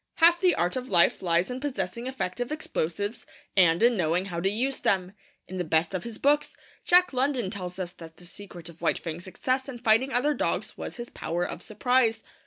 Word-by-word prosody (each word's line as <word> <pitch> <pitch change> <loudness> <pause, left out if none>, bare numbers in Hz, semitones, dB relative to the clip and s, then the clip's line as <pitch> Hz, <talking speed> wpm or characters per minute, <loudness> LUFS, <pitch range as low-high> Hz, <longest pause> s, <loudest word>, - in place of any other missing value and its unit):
Half 340 +1 +5
the 365 -2 +4
art 175 +1 0
of 255 0 -4
life 175 -3 +4
lies 175 +4 +1
in 250 - -4
possessing 235 -4 -3
effective 245 -1 -3
explosives 205 - -3 0.3
and 175 -1 +4
in 240 0 +5
knowing 175 0 +1
how 175 -4 -4
to 190 +3 +1
use 255 +6 -1
them. 190 -5 0 0.3
In 185 0 -6
the - - +1
best 160 +1 +1
of 185 +1 -3
his 235 -2 -6
books, 295 +1 +2 0.3
Jack 360 -2 +5
London 255 -6 0
tells 180 -2 -5
us 180 -2 -4
that 165 -3 -13
the 180 - -15
secret 175 -1 -10
of 170 -1 -12
White - - +2
Fang's 170 +1 -6
success 255 +8 -2
in 255 - -6
fighting 235 +3 +3
other 260 +5 +2
dogs - - -2
was - - -6
his 240 0 -7
power 175 +1 -2
of - - -6
surprise. 240 +1 +1
205 Hz, 205 wpm, -27 LUFS, 175-255 Hz, 0.3 s, Half